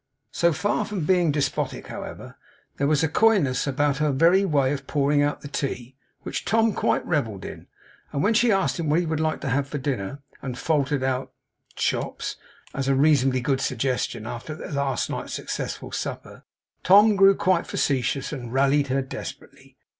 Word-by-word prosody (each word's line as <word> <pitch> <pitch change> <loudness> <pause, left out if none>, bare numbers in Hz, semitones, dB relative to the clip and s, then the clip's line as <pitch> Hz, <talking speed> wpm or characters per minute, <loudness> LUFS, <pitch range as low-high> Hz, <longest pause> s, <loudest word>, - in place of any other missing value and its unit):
So 170 0 +2
far 205 +6 0
from 195 -7 -3
being 175 -3 +3
despotic, 140 -2 -2
however, - - -8 0.4
there 140 - +1
was 150 0 +2
a - - +3
coyness 160 - +2
about 140 0 +1
her 150 0 +1
very 170 +8 +4
way 140 -6 +2
of 140 -1 -6
pouring 145 0 +2
out 145 0 0
the - - -7
tea, 130 -3 -4 0.3
which - - -4
Tom 225 +3 +2
quite - - 0
revelled 115 - -2
in. - - -9 0.4
And 140 - -1
when 215 - +3
she 235 +1 +4
asked 195 -2 +1
him 160 -3 -1
what 155 +3 +3
he 175 - -1
would 160 -1 -2
like 155 0 -1
to 140 - -3
have 135 +2 0
for 145 - -4
dinner, 135 -1 -4 0.2
and 125 -2 -5
faltered 145 -3 0
out 130 0 -2 0.4
'chops' - - -2 0.4
as 135 0 -2
a 135 - +3
reasonably 135 -3 +3
good 135 +1 0
suggestion 125 -3 -1
after 120 +6 -6
their 175 - -8
last 140 -3 -1
night's - - -5
successful - - -5
supper, - - -6 0.4
Tom 205 +3 +6
grew 195 0 +6
quite 185 -4 +1
facetious, 135 0 -1
and 120 -5 -6
rallied 140 +2 +2
her 135 +1 0
desperately. 130 - -9
145 Hz, 180 wpm, -24 LUFS, 135-165 Hz, 0.4 s, Tom